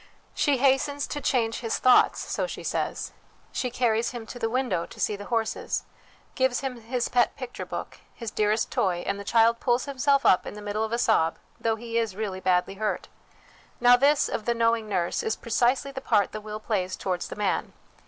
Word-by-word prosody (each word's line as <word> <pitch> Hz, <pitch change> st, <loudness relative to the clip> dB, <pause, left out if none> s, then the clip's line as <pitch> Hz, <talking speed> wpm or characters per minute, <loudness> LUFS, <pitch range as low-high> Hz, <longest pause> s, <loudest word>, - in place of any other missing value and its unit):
She 285 Hz, -3 st, +2 dB
hastens 275 Hz, +2 st, +2 dB
to 290 Hz, -, -5 dB
'change 230 Hz, -5 st, +1 dB
his 230 Hz, -2 st, -1 dB
thoughts/ 255 Hz, -1 st, +5 dB
so -, -, -1 dB
she -, -, -7 dB
says; -, -, -2 dB, 0.4 s
she 250 Hz, -, -2 dB
carries 235 Hz, -2 st, +1 dB
him 240 Hz, -3 st, -7 dB
to 245 Hz, -, -9 dB
the 225 Hz, -1 st, 0 dB
window 250 Hz, -8 st, -1 dB
to -, -, -13 dB
see 210 Hz, -, +1 dB
the 205 Hz, 0 st, -8 dB
horses, 225 Hz, -1 st, -1 dB, 0.5 s
gives 260 Hz, -1 st, +1 dB
him 255 Hz, -3 st, -4 dB
his 240 Hz, +2 st, -1 dB
pet 245 Hz, -1 st, +2 dB
picture 255 Hz, -2 st, -7 dB
book, -, -, -6 dB, 0.2 s
his 230 Hz, -3 st, -6 dB
dearest 215 Hz, +1 st, +1 dB
toy, 175 Hz, -3 st, 0 dB
and 200 Hz, -, -2 dB
the -, -, -6 dB
child 230 Hz, +2 st, +3 dB
pulls 245 Hz, -1 st, +1 dB
himself 275 Hz, 0 st, +1 dB
up 185 Hz, -, +4 dB
in -, -, -6 dB
the 210 Hz, -, -8 dB
middle 210 Hz, +1 st, -1 dB
of 220 Hz, -, -3 dB
a 235 Hz, -, +1 dB
sob, 165 Hz, -8 st, +2 dB, 0.2 s
though 225 Hz, -1 st, +1 dB
he 230 Hz, +1 st, -2 dB
is 225 Hz, -4 st, -2 dB
really 200 Hz, -3 st, -3 dB
badly 185 Hz, 0 st, +1 dB
hurt. 215 Hz, -, -2 dB, 0.7 s
Now 245 Hz, 0 st, +7 dB
this, 280 Hz, +3 st, +3 dB
of 215 Hz, -, -4 dB
the 235 Hz, -, +1 dB
knowing 230 Hz, -1 st, +1 dB
nurse, 180 Hz, -3 st, 0 dB
is 445 Hz, -1 st, -1 dB
precisely 260 Hz, +2 st, +1 dB
the 265 Hz, -1 st, -6 dB
part 210 Hz, -6 st, +2 dB
the 215 Hz, -, -6 dB
will 215 Hz, 0 st, -6 dB
plays 190 Hz, -4 st, -1 dB
towards 180 Hz, -2 st, -3 dB
the -, -, -7 dB
man. 205 Hz, -3 st, -1 dB
230 Hz, 205 wpm, -26 LUFS, 210-250 Hz, 0.7 s, Now